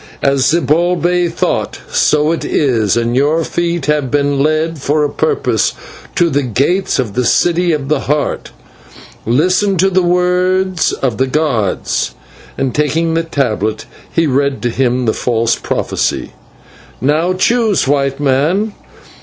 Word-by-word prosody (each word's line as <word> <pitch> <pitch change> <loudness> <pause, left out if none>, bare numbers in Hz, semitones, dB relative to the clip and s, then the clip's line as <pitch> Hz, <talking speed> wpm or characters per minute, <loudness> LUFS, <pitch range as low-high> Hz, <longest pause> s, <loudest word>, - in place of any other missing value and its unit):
As 140 -1 +2
Zibalbay 175 +2 +1
thought, - - -2
so 150 +1 +2
it 165 - -2
is, 115 -7 +1
and 120 +1 0
your 150 +5 +2
feet 170 -2 -2
have 150 -3 0
been 145 0 0
led 155 +1 0
for 150 +2 0
a 145 - +1
purpose 445 -2 0 0.4
to 170 -3 +2
the 145 - +1
gates 140 - 0
of 115 -6 -2
the 125 - 0
City 175 +6 +2
of 145 -4 -2
the 150 -1 +1
Heart. 145 0 -1 0.8
Listen 185 - +2
to 190 +3 +2
the 185 0 +3
words 180 0 +1
of 125 -5 -2
the 130 - +2
gods" 130 -9 -1 0.4
and, 135 -3 -1
taking 160 +4 0
the 165 - +1
tablet, 110 -9 -2 0.3
he 165 - +1
read 140 -1 0
to 120 - 0
him 125 0 0
the 110 - +1
false 115 -1 0
prophecy. - - -2 0.7
"Now 155 +7 +1
choose, 220 - +1
White 140 -1 0
Man. 150 +10 +1
150 Hz, 145 wpm, -15 LUFS, 135-175 Hz, 0.8 s, the